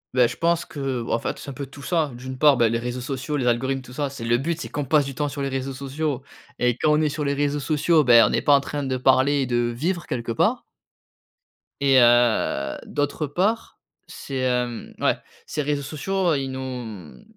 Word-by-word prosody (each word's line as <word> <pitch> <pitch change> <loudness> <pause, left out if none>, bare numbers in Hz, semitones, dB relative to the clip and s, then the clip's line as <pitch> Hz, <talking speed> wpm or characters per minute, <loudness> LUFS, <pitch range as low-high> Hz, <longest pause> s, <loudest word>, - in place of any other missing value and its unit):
Beh, 125 -2 +5
je - - -7
pense 170 0 +1
que 135 -4 -3
bah - - -3
en 115 - +2
fait, - - -4
c'est 140 - -8
un - - -8
peu 140 +1 -6
tout 140 +1 -12
ça. 160 -5 0
D'une 130 +2 -7
part, 145 -2 +6
bah, 120 -1 +4
les 115 +1 0
réseaux 125 +1 -4
sociaux, 135 +3 -3
les 130 - -1
algorithmes, 130 +2 0
tout 125 - -12
ça, 145 +1 -2
c'est 135 -4 -7
le 120 +1 +2
but, 165 +4 -2
c'est - - -5
qu'on 145 - -3
passe 145 +1 +3
du 135 - -5
temps 145 +2 -2
sur 140 0 -4
les 135 - -1
réseaux 135 0 -3
sociaux 140 0 -3 0.3
et 125 -1 +2
quand 155 - +2
on - - +2
est 155 - +2
sur 150 +1 -3
les 140 0 0
réseaux 145 0 0
sociaux, 155 +2 +2
beh, 120 -3 +7
on - - 0
n'est - - +1
pas 145 - +5
en - - +5
train 145 +1 -4
de 130 -2 -1
parler 130 +2 +3
et - - 0
de 120 -1 0 0.2
vivre, 170 +7 -2
quelque 120 -2 -3
part. 225 - +1 1.2
Et 135 -2 +5
heu, 120 - +3
d'autre 145 +1 -2
part, 200 +10 -1 0.3
c'est, 135 -1 -7
hem, 125 -2 -1
ouais, - - +2 0.3
ces 150 - -3
réseaux 145 0 -1
sociaux, 175 +5 -1
ils 135 -1 -2
nous, 130 - -5
mmh, 110 - -7
135 Hz, 235 wpm, -23 LUFS, 125-145 Hz, 1.2 s, beh